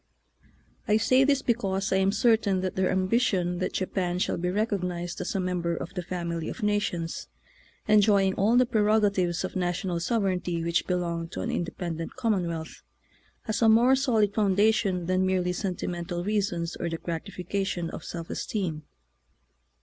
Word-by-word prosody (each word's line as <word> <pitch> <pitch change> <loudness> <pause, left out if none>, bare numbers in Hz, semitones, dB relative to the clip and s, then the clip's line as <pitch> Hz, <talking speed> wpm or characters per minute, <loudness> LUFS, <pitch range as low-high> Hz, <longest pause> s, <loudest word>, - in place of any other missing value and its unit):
I 210 -1 +4
say 255 +4 +4
this 280 0 +2
because 195 -4 0
I - - +3
am 190 0 +3
cer 225 +2 +4
tain 200 -4 -1
that 185 0 -3
their 190 -1 +1
ambition 185 -2 +1
that 185 - -2
Japan 180 -2 -1
shall 180 - 0
be 180 +1 -1
recognized 180 -4 -2
as - - -3
a - - +1
member 180 -2 -1
of 170 - -6
the 180 - -3
family 170 -2 -4
of 240 - -7
nations, 205 -5 -1 0.6
enjoying 205 -2 +4
all 215 +6 +3
the 250 - +5
prerogatives 205 -6 +2
of 185 - -5
national 180 -1 -1
sovereignty 180 -4 -1
which 170 0 0
belong 170 -2 -1
to 170 - -6
an 240 - -2
independent 170 -5 -4
commonwealth, 180 -10 -2 0.6
has 220 0 -2
a 225 - +6
more 240 +4 +6
solid 225 -7 +2
foundation 200 -2 +2
than 185 +1 +1
merely 185 -1 +1
sen 185 0 -2
timental 175 0 -4
reasons 190 -5 -1
or 170 - -2
the 165 - -3
gratification 180 +1 -3
of - - -7
self 170 -1 -6
esteem. 175 -8 -3
185 Hz, 160 wpm, -27 LUFS, 175-210 Hz, 0.6 s, a